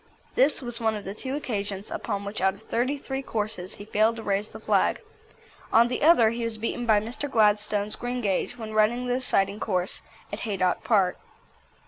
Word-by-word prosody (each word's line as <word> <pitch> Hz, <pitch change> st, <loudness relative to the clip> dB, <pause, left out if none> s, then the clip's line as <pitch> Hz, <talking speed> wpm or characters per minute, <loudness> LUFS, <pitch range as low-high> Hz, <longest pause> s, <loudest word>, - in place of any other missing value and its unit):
This 275 Hz, +1 st, +3 dB
was 240 Hz, -1 st, -3 dB
one 220 Hz, -1 st, +1 dB
of 210 Hz, -, -7 dB
the 195 Hz, -, -4 dB
two 260 Hz, +5 st, -4 dB
occasions 205 Hz, -7 st, -4 dB
upon 200 Hz, -2 st, -3 dB
which 200 Hz, 0 st, -5 dB
out 190 Hz, 0 st, +2 dB
of -, -, -16 dB
thirty 255 Hz, +5 st, 0 dB
three 270 Hz, -1 st, -4 dB
courses 210 Hz, -7 st, -4 dB
he 205 Hz, -, -10 dB
failed 215 Hz, +2 st, +2 dB
to 225 Hz, -, -7 dB
raise 200 Hz, 0 st, 0 dB
the -, -, -10 dB
flag. -, -, +2 dB, 0.7 s
On 235 Hz, +1 st, +5 dB
the 250 Hz, -, -2 dB
other 280 Hz, -8 st, +6 dB
he 235 Hz, 0 st, -3 dB
was 230 Hz, -1 st, -2 dB
beaten 235 Hz, +2 st, -3 dB
by 215 Hz, -2 st, +5 dB
Mr. 235 Hz, +7 st, -4 dB
Gladstone's 210 Hz, -2 st, +2 dB
Greengage, 245 Hz, -2 st, -2 dB
when 220 Hz, -2 st, -6 dB
running 220 Hz, +3 st, +2 dB
the 245 Hz, -, +1 dB
deciding 205 Hz, -5 st, +1 dB
course 185 Hz, -4 st, -1 dB, 0.3 s
at -, -, -3 dB
Haydock 190 Hz, -5 st, 0 dB
Park. 205 Hz, -5 st, +2 dB
220 Hz, 190 wpm, -26 LUFS, 205-240 Hz, 0.7 s, other